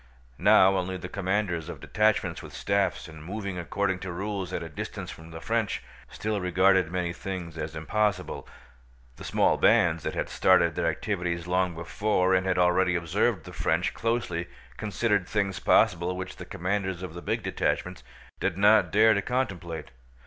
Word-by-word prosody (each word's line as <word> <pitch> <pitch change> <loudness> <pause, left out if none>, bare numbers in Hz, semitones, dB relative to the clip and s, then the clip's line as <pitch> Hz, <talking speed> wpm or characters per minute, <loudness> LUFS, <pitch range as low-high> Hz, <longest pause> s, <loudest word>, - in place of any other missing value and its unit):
Now 95 +1 +6
only 95 0 -2
the 90 - -7
commanders 95 -4 -1
of - - -7
detachments 110 0 +1
with - - -11
staffs, 100 -3 0
and 80 -1 -11
moving 100 +1 -5
according 95 +2 -1
to 95 0 -5
rules 95 0 -4
at 85 - -3
a - - -6
distance 75 - -6
from 80 0 -12
the 80 0 -8
French, 115 +2 -1 0.3
still 105 -2 -3
regarded 95 -1 +3
many 90 -2 -1
things 90 -3 -6
as 80 0 -5
impossible. 95 +4 -1 0.7
The - - -10
small - - +2
bands 85 -2 +4
that - - -4
had - - -1
started - - +3
their - - 0
activities 90 -4 -2
long 90 -1 0
before 95 +3 0
and 95 0 +2
had 90 - +1
already 90 0 +3
observed 90 +3 0
the - - -11
French - - 0
closely 115 -7 -1 0.3
considered 105 -2 0
things 100 -3 -1
possible 90 +1 +3
which 95 0 -6
the - - -8
commanders 95 0 -2
of 90 -4 -6
the 85 - -7
big - - -2
detachments 90 0 -2 0.4
did - - -1
not 105 -3 +5
dare 110 +2 +6
to 100 - +1
contemplate. 95 -9 -3
95 Hz, 170 wpm, -27 LUFS, 85-100 Hz, 0.7 s, Now